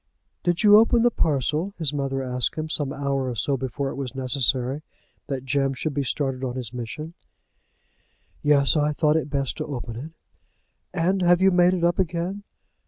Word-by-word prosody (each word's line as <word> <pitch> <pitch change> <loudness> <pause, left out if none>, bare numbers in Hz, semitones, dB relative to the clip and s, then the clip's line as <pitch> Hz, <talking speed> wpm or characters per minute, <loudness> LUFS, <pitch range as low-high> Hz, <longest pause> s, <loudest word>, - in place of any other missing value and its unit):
"Did 175 +1 0
you 210 0 +8
open 230 +1 +4
the 240 - +4
parcel?" 155 - 0
his 155 -3 +1
mother 135 -1 -2
asked 125 -1 -1
him, 155 0 -4
some 145 -3 -1
hour 140 -2 -1
or 120 - -4
so 140 +4 0
before 135 +2 -3
it - - -5
was 135 -1 -5
necessary 130 +1 0 0.5
that 135 -2 -4
Jem 135 0 0
should 150 +4 -3
be 140 0 -1
started 135 -1 -2
on 125 -1 -3
his 125 -3 -6
mission. 125 +7 -6 1.3
"Yes; 145 -1 +4
I 150 0 +2
thought 150 +1 +2
it 160 -2 0
best 140 -2 -2
to - - -2
open 120 -5 -5
it." 150 +7 -7 0.8
"And 185 +2 0
have 175 0 +4
you 190 0 +5
made 180 0 +4
it 175 - -3
up 175 +2 +2
again?" 180 +2 -1
145 Hz, 185 wpm, -24 LUFS, 135-170 Hz, 1.3 s, you